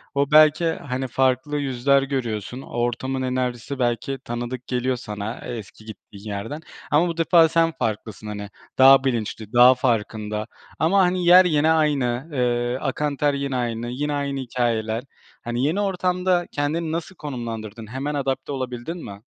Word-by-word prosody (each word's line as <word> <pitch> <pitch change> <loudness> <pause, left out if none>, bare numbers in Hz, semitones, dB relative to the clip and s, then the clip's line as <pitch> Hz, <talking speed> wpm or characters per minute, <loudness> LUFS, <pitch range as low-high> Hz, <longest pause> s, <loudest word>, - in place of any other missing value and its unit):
O 140 +1 +1
belki, 155 +1 +6
eee, 165 -1 0
hani, 130 +1 -2
farklı 130 +3 +1
yüzler 135 0 +2
görüyorsun, 125 -3 -3
o - - -12
ortamın 120 +3 -2
enerjisi 130 +1 -2
belki 120 +2 -1
tanıdık 120 +1 -5
geliyor 125 +1 0
sana, 105 -1 -6
eee, 120 - -4
eski 110 0 -11
gittiğin 105 -1 -12
yerden 110 +10 -5 0.3
ama 155 +4 +4
bu 170 -1 -4
defa 165 -1 +5
sen 165 0 +2
farklısın, 110 -1 -3
hani, 105 -1 -6 0.3
daha 135 0 +8
bilinçli, 115 -3 -3
daha 125 +1 +8
farkında 110 -4 -1 0.3
ama, 185 +5 +3
hani, 180 -1 +1
yer 180 +2 +8
yine 155 -2 +3
aynı, 145 -3 +1
eee, 120 -1 0
akan 145 0 -2
ter 145 -2 +2
yine 140 -1 -2
aynı, 120 -1 -2
yine 145 +4 -2
aynı 140 -1 -2
hikâyeler. 115 -2 -1 0.4
Hani, 120 +1 -2
yeni 165 +8 +1
ortamda 180 -2 0
kendini 155 +3 -1
nasıl 170 +3 -4
konumlandırdın? 115 - -6
Hemen 135 +5 -4
adapte 135 0 -2
olabildin 130 +5 -5
mi? 100 +1 -10
130 Hz, 160 wpm, -23 LUFS, 120-150 Hz, 0.4 s, daha